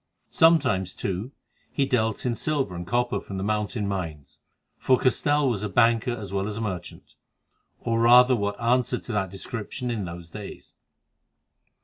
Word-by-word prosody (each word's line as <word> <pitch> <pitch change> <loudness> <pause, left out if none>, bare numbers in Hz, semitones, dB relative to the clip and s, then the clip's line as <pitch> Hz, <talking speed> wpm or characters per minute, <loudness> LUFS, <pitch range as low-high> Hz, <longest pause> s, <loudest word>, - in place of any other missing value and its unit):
Sometimes, 130 - +3
too, 100 +7 -3 0.4
he 140 - +1
dealt 115 -4 0
in 125 - +1
silver 135 -3 -1
and 85 0 -6
copper 120 +3 0
from 95 - -7
the 95 - -3
mountain 105 +1 -1
mines, 80 -7 -5 0.4
for 130 - +3
Castell 145 +3 +2
was 115 -6 0
a 105 - -3
banker 115 +3 +3
as 105 -5 -7
well 100 0 -1
as 105 0 -4
a - - -3
merchant, 95 -6 -6 0.7
or 115 -1 -1
rather 125 +2 +7
what 100 -2 -2
answered 125 +1 +1
to - - -6
that 100 -3 -1
description 115 +5 -5
in 110 -5 -2
those 85 -1 -9
days. 105 +1 -9
110 Hz, 160 wpm, -25 LUFS, 95-125 Hz, 0.7 s, rather